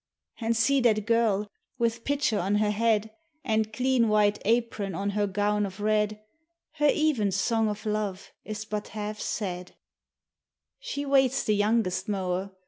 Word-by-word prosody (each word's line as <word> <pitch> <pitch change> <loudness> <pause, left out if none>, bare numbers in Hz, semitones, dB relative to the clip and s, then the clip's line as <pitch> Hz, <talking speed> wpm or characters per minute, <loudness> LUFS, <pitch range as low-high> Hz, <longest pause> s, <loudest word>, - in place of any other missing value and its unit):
And 230 -1 0
see 270 +4 +3
that 215 -4 +2
girl, 225 -3 +2 0.3
with 230 0 -1
pitcher 285 -6 +1
on 195 +4 0
her 210 0 +2
head, 220 0 +1 0.3
And 220 -3 0
clean 250 +1 +2
white 210 -1 +3
apron 220 -4 0
on 200 +3 -1
her 205 0 0
gown 205 +1 0
of 195 0 -5
red, 210 0 +1 0.3
— 335 0 -57
Her 295 0 +4
even 285 -11 +1
song 220 +3 +1
of 210 +1 -6
love 210 -3 -3
is 215 0 -6
but 210 -1 -4
half 210 0 -4
said: 180 -4 -4 1.0
She - - -4
waits 270 -1 +3
the 215 - +1
youngest 205 -2 +1
mower. 190 -1 -2
215 Hz, 155 wpm, -27 LUFS, 205-230 Hz, 1.0 s, Her